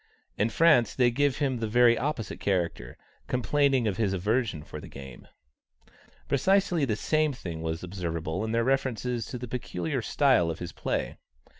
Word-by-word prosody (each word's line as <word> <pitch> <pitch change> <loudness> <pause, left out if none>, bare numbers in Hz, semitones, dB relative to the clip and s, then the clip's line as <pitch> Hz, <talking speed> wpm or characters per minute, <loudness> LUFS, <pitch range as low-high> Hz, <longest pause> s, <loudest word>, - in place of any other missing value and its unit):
In 105 +3 +1
France 150 -7 +4
they 125 -2 +3
give 145 +2 +1
him 135 -4 0
the 115 - -2
very 120 +1 +5
opposite 125 -4 -3
character, 85 -10 -2 0.3
complaining 135 -1 +2
of 100 -3 -1
his 105 -4 +1
aversion 105 - -1
for - - -8
the - - -10
game. 65 -2 -11 1.0
Precisely 175 +2 +2
the 110 -5 0
same 155 +6 +1
thing 85 -9 -6
was 80 +1 -3
observable 85 -2 -3
in 110 - -2
their 115 0 +1
references 125 -2 -1
to 125 - -5
the 125 +1 -6
peculiar 90 -9 -3
style 85 -1 +3
of 80 - -3
his 90 - -6
play. - - -3
115 Hz, 165 wpm, -28 LUFS, 90-135 Hz, 1.0 s, very